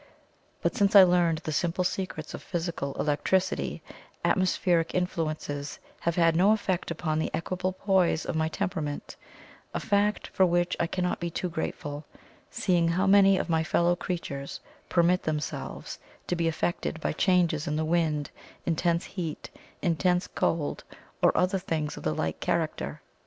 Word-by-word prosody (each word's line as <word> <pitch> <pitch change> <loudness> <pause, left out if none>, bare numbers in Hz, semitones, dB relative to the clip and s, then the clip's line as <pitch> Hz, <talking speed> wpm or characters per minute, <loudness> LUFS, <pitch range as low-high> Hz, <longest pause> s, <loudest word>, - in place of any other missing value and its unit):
But - - +1
since 200 -3 +2
I 195 - +12
learned 175 -3 +3
the 155 - -3
simple 170 +4 0
secrets 180 -4 -3
of - - -6
physical 170 -5 -3
electricity, 185 +5 0 0.4
atmospheric 180 -3 +2
influences 155 -5 -2 0.2
have 170 -1 -1
had 165 -2 +4
no 195 +5 +5
effect 190 -4 -1
upon 160 -2 -1
the - - 0
equable 185 +2 -2
poise 190 -4 +2
of - - -3
my 160 0 +1
temperament 155 -3 -3 0.6
a - - +1
fact 205 0 +1
for 190 - +2
which 175 0 +2
I 170 - +1
cannot 180 +1 -1
be 170 - -2
too 180 +2 -3
grateful, 150 -2 -4 0.5
seeing 175 -3 +1
how 180 +3 +1
many 195 0 +6
of - - -1
my 160 -2 +2
fellow 170 +3 +2
creatures 155 -6 -4 0.3
permit 175 +1 +3
themselves 150 -1 -4 0.3
to 180 - -1
be 170 -1 0
affected 165 0 -1
by - - -1
changes 170 -3 +2
in 150 - 0
the 155 +1 0
wind, 155 -3 0 0.3
intense 170 +1 +1
heat, 165 -6 -5 0.3
intense 180 +1 +2
cold, 160 -3 -1 0.4
or - - +6
other 185 +1 +2
things 155 -4 -2
of - - -8
the 75 0 -1
like 80 +1 -2
character. - - -2
170 Hz, 155 wpm, -28 LUFS, 160-185 Hz, 0.6 s, I